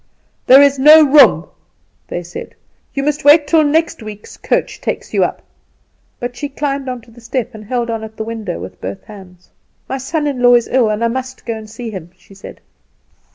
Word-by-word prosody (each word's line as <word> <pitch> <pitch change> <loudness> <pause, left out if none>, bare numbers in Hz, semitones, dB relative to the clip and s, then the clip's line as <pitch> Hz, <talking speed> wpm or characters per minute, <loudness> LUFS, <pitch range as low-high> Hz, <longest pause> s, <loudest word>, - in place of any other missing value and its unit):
"'There 270 +2 +8
is 280 -1 +2
no 305 +3 +8
room,' 285 +1 +5 0.6
they 175 - -5
said; 175 +1 -9 0.4
'you 275 - -3
must 300 +1 -1
wait 295 +1 +6
till 315 +1 +3
next 320 +1 0
week's 210 -1 -10
coach - - -2
takes - - -4
you - - +2
up;' - - -3 0.8
but 245 0 -5
she 290 +3 -5
climbed 275 -1 -3
on 250 -1 -5
to 230 - -20
the 240 +1 -16
step, 240 +1 -4
and 215 -1 -11
held 240 +1 -2
on 225 -1 -4
at 220 0 -10
the 220 - -3
window 220 -5 -5
with 95 - -10
both 95 +1 -6
hands. 185 -4 -15 0.4
"'My 265 - -4
son 295 +4 -2
in 275 -4 -2
law 245 0 +6
is 235 - +2
ill, 245 -4 +2
and 215 +2 -2
I - - +3
must 260 +2 -5
go 230 - -2
and 215 -1 -10
see 225 +1 -7
him,' 180 -5 -8
she 185 +2 -19
said. 195 - -12
245 Hz, 210 wpm, -16 LUFS, 215-280 Hz, 0.8 s, There